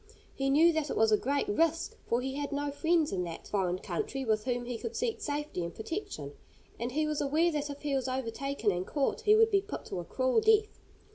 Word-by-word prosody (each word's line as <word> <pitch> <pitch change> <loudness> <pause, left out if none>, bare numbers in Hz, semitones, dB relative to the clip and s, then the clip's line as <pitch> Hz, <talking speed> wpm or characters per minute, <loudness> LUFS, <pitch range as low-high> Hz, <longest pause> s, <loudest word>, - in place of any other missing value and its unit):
He 270 0 -1
knew 325 +5 +6
that 315 -2 -1
it - - -2
was 220 0 +4
a - - +7
great 280 - 0
risk, 330 -4 +1
for 235 +1 +1
he 265 +1 -3
had 285 +1 -3
no 285 0 -1
friends 320 +1 +2
in 185 -2 -1
that 165 -1 -7
foreign 185 -3 0
country 270 - -3
with 215 -2 +1
whom 245 -1 -1
he 240 -2 -4
could - - -5
seek 470 -2 -1
safety 295 - -3
and 170 0 -5
protection; 220 - -5 0.5
and 240 +2 -3
he 310 +2 +1
was 305 -1 -1
aware 310 +5 +2
that 295 -1 -2
if 285 +1 -8
he 290 -1 -1
was 265 -1 0
overtaken 260 -1 -1
and 180 0 -3
caught 285 -3 0
he 425 0 +5
would 450 +1 +5
be 395 -1 +4
put 405 - -7
to - - -4
a - - -4
cruel 260 - +1
death. 435 -1 +3
280 Hz, 235 wpm, -31 LUFS, 235-325 Hz, 0.5 s, a